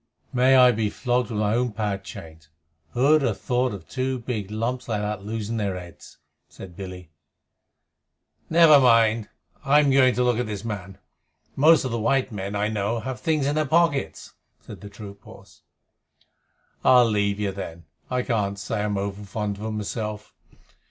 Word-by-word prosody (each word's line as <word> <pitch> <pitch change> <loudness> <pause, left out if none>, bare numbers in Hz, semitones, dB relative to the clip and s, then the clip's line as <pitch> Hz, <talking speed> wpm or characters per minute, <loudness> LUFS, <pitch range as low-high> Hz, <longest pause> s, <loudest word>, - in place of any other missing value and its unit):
"May 130 +1 +4
I 125 -1 +7
be 110 -2 -1
flogged 125 +1 -1
with 105 - -3
my 105 0 +1
own 120 -1 0
pad 105 -2 -3
chains! 80 -4 -11 0.4
Who'd 145 +5 +4
have 115 -7 -1
thought 125 0 0
of 95 -5 -9
two 130 0 -2
big 115 -5 -5
lumps 120 +4 -3
like 105 -2 -1
those 105 -1 -4
losing 110 +1 -4
their 100 -4 -2
heads?" 90 -1 -12 0.3
said 90 -3 -12
Billy. 90 -3 -9 1.4
"Never 160 -3 +7
mind. 115 -4 +3 0.3
I'm 145 0 +4
going 130 -2 +4
to 125 - +1
look 120 -1 +1
at 125 - -2
this 105 0 -6
man. 100 -4 -6 0.6
Most 155 +1 +5
of 130 - -3
the 115 - -2
white 130 +3 +1
men, 100 -1 -5
I 105 +1 0
know, 110 +2 -2
have 130 -2 -5
things 155 -1 0
in 145 - +1
their 155 0 0
pockets," 145 - 0 0.3
said - - -12
the 100 - -9
troop 100 -1 -11
horse. - - -16 1.2
"I'll 125 -1 +6
leave 100 -2 0
you, 100 -2 -1
then. 85 -4 -8 0.2
I 125 -1 -1
can't 100 -5 -1
say 105 +1 -3
I'm 105 -1 -1
over 100 +1 -4
fond 105 0 -4
of 105 - -9
'em 110 -1 -3
myself. 105 0 -5
110 Hz, 175 wpm, -24 LUFS, 100-125 Hz, 1.4 s, I